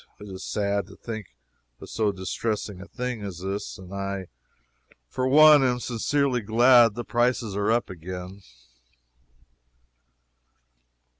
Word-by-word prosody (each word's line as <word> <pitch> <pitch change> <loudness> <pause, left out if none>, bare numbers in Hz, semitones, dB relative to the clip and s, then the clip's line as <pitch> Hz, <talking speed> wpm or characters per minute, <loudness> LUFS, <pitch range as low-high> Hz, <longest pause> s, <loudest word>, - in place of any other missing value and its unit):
It 105 - -10
is 95 0 -8
sad 100 -2 -1
to - - -14
think 110 -4 -7 0.5
of - - -10
so 110 -2 0
distressing 100 +1 -4
a 100 - -10
thing 125 -2 -5
as 100 -4 -6
this, 100 +2 -4
and 95 0 -12
I 100 -1 -4 0.8
for 130 - -2
one 150 +2 +7
am 125 -1 +1
sincerely 125 +2 0
glad 115 +1 +5
the 120 - -4
prices 120 -3 0
are 100 +1 0
up 120 +1 +1
again. 90 +2 -8
105 Hz, 130 wpm, -25 LUFS, 100-120 Hz, 0.8 s, one